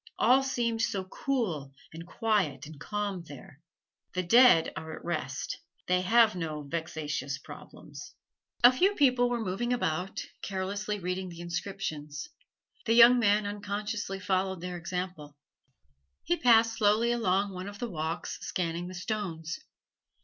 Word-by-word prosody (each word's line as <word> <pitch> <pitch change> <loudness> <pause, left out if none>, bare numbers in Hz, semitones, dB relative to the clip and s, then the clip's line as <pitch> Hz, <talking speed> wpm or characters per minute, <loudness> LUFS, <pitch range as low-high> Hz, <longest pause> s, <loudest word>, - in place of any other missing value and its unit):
All 260 +2 +5
seemed 235 -4 -1
so 195 -3 0
cool 185 - -3 0.2
and 165 +1 -9
quiet 195 - 0
and 150 -1 -11
calm 205 +1 -3
there! 140 0 -12 0.5
The 185 - 0
dead 230 -4 +6
are 160 0 -6
at - - -12
rest: 155 -6 -3 0.3
they 180 0 +2
have 220 +3 +5
no 155 -4 -4
vexatious 150 -3 -3
problems. - - -12 0.5
A 245 - +10
few 380 +10 +2
people 255 -5 +4
were 240 -1 -1
moving 195 +6 -2
about, 185 -6 -1 0.2
carelessly 200 +2 -3
reading 180 0 -3
the 170 -1 -9
inscriptions. 170 - -4 0.6
The 225 - +4
young 240 +1 +8
man 205 -2 +3
unconsciously 205 0 -4
followed 190 -1 0
their 180 0 -5
example; 175 -4 -5 0.9
he 175 - +1
passed 225 0 +4
slowly 215 +3 +3
along 200 -4 +1
one 185 +1 -6
of 205 0 -8
the 240 - -3
walks, 160 0 -4
scanning 170 -1 -3
the 185 - -8
stones. 175 -5 -4
190 Hz, 140 wpm, -29 LUFS, 165-225 Hz, 0.9 s, A